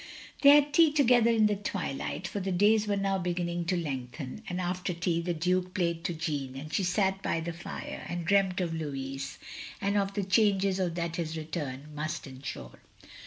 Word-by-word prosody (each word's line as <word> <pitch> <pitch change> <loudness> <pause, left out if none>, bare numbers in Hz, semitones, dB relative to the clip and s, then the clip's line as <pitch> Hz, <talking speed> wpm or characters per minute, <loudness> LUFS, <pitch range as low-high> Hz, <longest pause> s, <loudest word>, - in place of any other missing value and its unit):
" - - -17
They 280 - +8
had 290 0 +6
tea 330 -3 +6
together 250 -5 +5
in 225 -2 +4
the 210 -1 +3
twilight, 185 -3 -3
for 200 - -4
the 190 0 -2
days 210 +4 +4
were 205 -1 +1
now 195 -1 0
beginning 175 -1 -2
to 180 +1 +1
lengthen; 135 - -5
and 180 +1 -3
after 180 0 -2
tea, 170 0 0
the 175 0 -2
Duke 180 +3 0
played 170 -3 0
to 175 - 0
Jeanne; 145 -5 -3
and 150 +3 -7
she 195 - +1
sat 190 +1 +1
by 165 - 0
the 165 +1 -4
fire, 170 - -7
and 175 -1 -3
dreamt 195 -1 +3
of 175 -2 -1
Lotiis, 135 -3 -4 0.4
and 200 +1 +1
of 200 0 0
the 205 - 0
changes 195 0 +3
that 170 -2 -2
his 165 -1 -3
return 150 -3 -5
must 155 +2 -4
ensure. 130 - -8
180 Hz, 195 wpm, -29 LUFS, 160-195 Hz, 0.4 s, They